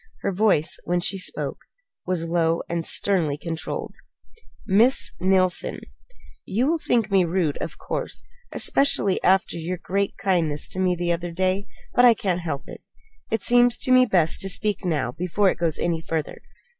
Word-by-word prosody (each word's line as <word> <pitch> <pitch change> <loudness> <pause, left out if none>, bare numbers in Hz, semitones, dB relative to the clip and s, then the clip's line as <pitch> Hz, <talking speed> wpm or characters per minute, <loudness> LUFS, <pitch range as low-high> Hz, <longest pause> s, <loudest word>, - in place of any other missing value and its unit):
Her 200 - -1
voice, 190 -5 +1
when 175 +1 0
she 195 +2 -1
spoke, 180 - -4 0.5
was 180 -2 -1
low 165 -1 +1
and 170 -1 -2
sternly 165 -6 +1
controlled. 165 0 -5 0.7
"Miss 225 +7 +3
Neilson, 185 -1 +1 0.6
you 230 +6 -1
will 325 +3 +1
think 230 -7 0
me 190 -2 +4
rude, 170 -3 -1
of - - -6
course, - - -5 0.3
especially 205 -8 +2
after 190 -2 +2
your 170 +2 -4
great 195 +3 -2
kindness 165 -6 0
to 185 - -5
me 185 -1 +2
the 175 0 -1
other 175 +1 -2
day; 185 +4 -1 0.3
but 245 - +4
I 240 -2 +7
can't 180 -4 -2
help 150 -5 -4
it. - - -10 0.5
It 225 -3 -1
seems 245 0 +4
to 255 - -2
me 255 0 +6
best 165 -4 +2
to 195 - +1
speak 210 +2 +1
now 150 -9 -1
before 185 +6 +1
it - - -7
goes 165 -2 0
any 170 -2 -1
further." 160 -2 -4
185 Hz, 170 wpm, -23 LUFS, 170-200 Hz, 0.7 s, I